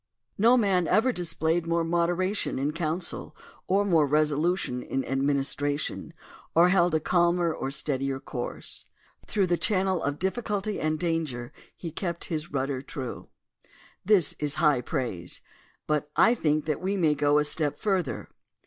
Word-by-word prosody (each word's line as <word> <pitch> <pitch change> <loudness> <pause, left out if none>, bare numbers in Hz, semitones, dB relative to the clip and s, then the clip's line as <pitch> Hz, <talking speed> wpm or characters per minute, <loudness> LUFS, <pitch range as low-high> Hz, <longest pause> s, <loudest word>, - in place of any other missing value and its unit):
No 235 +4 +6
man 190 -7 +2
ever 245 +4 +3
displayed 170 -3 0
more 170 0 +1
moderation 175 +4 0
in 140 +3 0
counsel, 165 +1 -2 0.3
or 200 +2 +2
more 165 -6 +4
resolution 150 -1 +1
in 135 +1 -3
administration, 140 +1 -1 0.4
or 170 +2 +6
held 175 -3 +3
a - - +3
calmer 175 0 +2
or 135 - -3
steadier 135 -1 -2
course. 125 -2 -5 0.4
Through 200 -2 +1
the 175 -1 +1
channel 190 -4 +1
of 140 +1 -1
difficulty 205 +1 -2
and 155 0 0
danger, 155 -8 -2 0.3
he 170 - -6
kept 170 +1 -4
his 155 +1 -3
rudder 135 -1 -1
true." 130 -2 -6 0.4
^ - - -30 0.3
This 190 -5 +4
is 145 -1 -1
high 150 -6 +3
praise, 120 - -3 0.4
but 150 -1 0
I 230 - +6
think 155 -8 0
that 155 0 -1
we 195 +2 -1
may 160 -5 +3
go 145 0 +3
a 150 - +4
step 150 0 -1
further. 190 - -1
160 Hz, 150 wpm, -27 LUFS, 145-180 Hz, 0.4 s, No